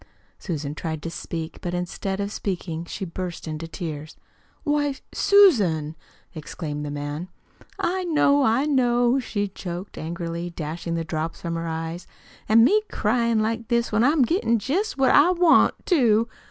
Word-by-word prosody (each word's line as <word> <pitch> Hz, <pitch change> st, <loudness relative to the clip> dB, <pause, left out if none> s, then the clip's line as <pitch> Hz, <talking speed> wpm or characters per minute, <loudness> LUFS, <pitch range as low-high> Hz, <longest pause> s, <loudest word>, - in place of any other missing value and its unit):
Susan 150 Hz, -6 st, -4 dB
tried 160 Hz, 0 st, -4 dB
to 165 Hz, -, -4 dB
speak, 165 Hz, -1 st, -6 dB
but 175 Hz, 0 st, -3 dB
instead 190 Hz, +2 st, -3 dB
of 200 Hz, 0 st, -2 dB
speaking 170 Hz, -5 st, -4 dB
she 190 Hz, -, -5 dB
burst 175 Hz, -1 st, -6 dB
into 155 Hz, +1 st, -5 dB
tears. 160 Hz, -2 st, -6 dB, 0.5 s
"Why, 290 Hz, -2 st, +1 dB, 0.2 s
Susan!" 200 Hz, -, +4 dB, 0.4 s
exclaimed 150 Hz, -1 st, -5 dB
the 145 Hz, -, -4 dB
man. 145 Hz, +4 st, -5 dB, 0.5 s
"I 370 Hz, +1 st, -1 dB
know, 290 Hz, -4 st, +3 dB
I 260 Hz, +2 st, +3 dB
know," 245 Hz, -3 st, +3 dB
she 205 Hz, -5 st, -2 dB
choked, 185 Hz, 0 st, -7 dB
angrily 170 Hz, +1 st, -4 dB
dashing 165 Hz, +1 st, -4 dB
the 165 Hz, -, -1 dB
drops 160 Hz, 0 st, -4 dB
from 170 Hz, -1 st, -3 dB
her 165 Hz, 0 st, -3 dB
eyes. 165 Hz, +2 st, -5 dB, 0.4 s
"An' 225 Hz, +1 st, +7 dB
me 420 Hz, -, +5 dB
cryin' 230 Hz, 0 st, +1 dB
like 225 Hz, +1 st, -2 dB
this 235 Hz, 0 st, +1 dB
when 215 Hz, +1 st, +3 dB
I'm 285 Hz, +1 st, +4 dB
gettin' 240 Hz, -, +2 dB
jest 310 Hz, -, -1 dB
what 265 Hz, -2 st, +4 dB
I 295 Hz, +5 st, +6 dB
want, 350 Hz, -2 st, +5 dB
too!" 230 Hz, -, +3 dB
195 Hz, 155 wpm, -24 LUFS, 165-250 Hz, 0.5 s, An